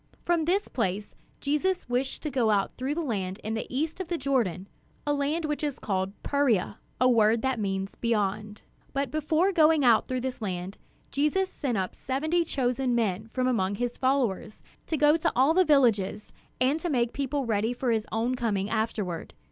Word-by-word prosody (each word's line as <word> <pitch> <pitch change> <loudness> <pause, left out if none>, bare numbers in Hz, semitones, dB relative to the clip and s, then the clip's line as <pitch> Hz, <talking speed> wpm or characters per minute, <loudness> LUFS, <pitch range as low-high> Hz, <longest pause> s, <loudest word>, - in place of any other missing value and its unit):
From 340 -2 +2
this 385 +5 +1
place 205 -3 -2 0.3
Jesus 300 +6 0
wished 250 +2 -2
to 300 - -2
go 245 -5 +2
out 200 -2 +2
through 265 +3 -2
the 335 - -1
land 195 -7 -3
in 220 - -3
the 225 - -3
east 305 +7 -2
of 375 - -4
the 345 0 -1
Jordan, 235 - 0 0.4
a 290 - +1
land 290 +3 0
which 300 0 -2
is 290 -3 -1
called 190 -1 -2
"Perea," 245 -8 +1 0.2
a 255 - +5
word 225 -2 +4
that 265 -3 0
means 195 -1 -2
"beyond." 210 -2 -2 0.3
But 275 -2 -1
before 310 +5 +2
going 315 -5 +4
out 225 -3 +5
through 255 -1 -2
this 255 -1 -4
land, 185 -1 -4 0.3
Jesus 305 +7 +1
sent 250 -6 -2
out 185 -1 -2
seventy 315 +7 0
chosen 255 -4 0
men 215 -2 0
from 255 +3 -2
among 205 -6 +1
his 245 +3 -2
followers 250 -6 -1 0.2
to 315 - -1
go 295 +2 +5
to 325 - 0
all 270 +5 +4
the 370 +2 +5
villages, 235 - +2 0.3
and 265 +5 +2
to 350 - -3
make 240 -5 +1
the - - -25
people 280 0 -1
ready 220 0 0
for 245 0 -1
his 220 -1 0
own 230 +3 0
coming 215 -5 -1
afterward. 215 -6 -2
250 Hz, 190 wpm, -27 LUFS, 215-290 Hz, 0.4 s, a